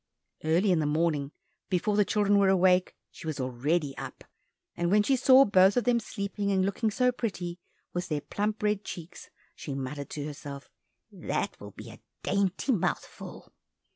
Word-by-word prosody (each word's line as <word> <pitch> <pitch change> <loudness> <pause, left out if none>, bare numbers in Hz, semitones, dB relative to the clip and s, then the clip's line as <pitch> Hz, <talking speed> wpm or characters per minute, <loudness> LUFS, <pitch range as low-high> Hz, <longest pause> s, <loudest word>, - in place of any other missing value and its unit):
Early 170 +6 +3
in 175 - +3
the 150 - 0
morning 150 -2 0 0.4
before 200 +2 +1
the 210 - +5
children 205 0 +2
were 195 -1 +4
awake, 185 -1 +3 0.2
she 165 - -10
was 155 -3 -3
already 135 +4 -1
up, - - -8 0.5
and 175 0 0
when 205 +2 +4
she 270 - +3
saw 265 +1 +7
both 190 0 +5
of 245 - +3
them 245 -1 +3
sleeping 200 -2 -3
and 190 -1 +2
looking 210 +3 0
so 250 +4 +2
pretty, 185 -8 -4 0.3
with 175 +1 -2
their 150 -4 -2
plump 210 +5 -3
red 210 -1 +1
cheeks, 175 0 -9 0.2
she 140 - -6
muttered 140 +1 -5
to 145 -1 -5
herself, 145 -2 -8 0.4
"That - - -3
will - - -9
be - - -11
a - - -14 0.2
dainty 200 +6 0
mouthful!" 185 -6 -3
185 Hz, 170 wpm, -28 LUFS, 155-205 Hz, 0.5 s, saw